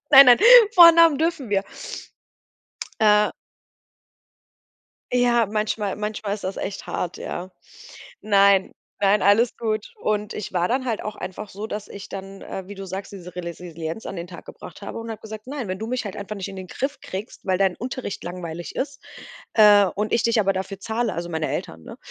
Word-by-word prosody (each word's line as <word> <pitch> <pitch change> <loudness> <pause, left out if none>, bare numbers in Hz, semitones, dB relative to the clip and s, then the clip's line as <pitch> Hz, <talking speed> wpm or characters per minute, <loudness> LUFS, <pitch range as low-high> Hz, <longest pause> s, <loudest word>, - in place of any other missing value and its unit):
Nein, 275 -2 +10
nein, 245 - +8 0.4
Vornamen 335 -4 +8
dürfen 315 -8 -1
wir. 195 -1 +2 1.4
Äh. 210 -1 +5 1.8
Ja, 240 -2 +3
manchmal 210 -1 -2
manchmal 210 -1 -3
ist 210 - -9
das 190 +1 -4
echt 195 - -5
hart, 175 - -3
ja. 185 +2 -6 0.7
Nein, 200 -2 +4 0.3
nein, 200 +1 +3
alles 220 +4 +3
gut. 215 -2 -2
Und 210 0 -1
ich 210 - -6
war 175 0 +1
dann 260 +1 -1
halt 225 -3 -2
auch 210 0 -5
einfach 200 +3 -7
so, 205 +3 -6
dass 210 -1 -6
ich 200 -1 -9
dann, 195 0 -8
äh, 190 -1 -7
wie 205 - -9
du 195 0 -7
sagst, 190 +1 -6
diese 180 -3 -10
Resisilienz 170 +1 -6
an - - -5
den 170 0 -6
Tag 175 -1 -11
gebracht - - -11
habe - - -6
und 230 0 -7
habe 220 -1 -7
gesagt: 220 +1 -9
„Nein, 265 -5 -5
wenn 185 0 -4
du 220 - -4
mich 250 -1 -2
halt 200 - -6
einfach 200 +1 -6
nicht 195 0 -5
in 195 - -9
den 185 -1 -8
Griff 275 +9 -4
kriegst, 195 +3 -8
weil 185 -1 +2
dein 190 -2 +2
Unterricht 255 -4 -5
langweilig 175 -1 -7
ist, 275 0 -4 0.5
äh, 210 -2 +7
und 210 +1 -2
ich 235 - +2
dich 230 -1 +3
aber 195 -1 +2
dafür 190 +1 -5
zahle, 225 0 -2
also, 170 +1 -4
meine 160 -1 -2
Eltern, 80 0 -5
ne, - - -10
205 Hz, 190 wpm, -23 LUFS, 190-225 Hz, 1.8 s, Nein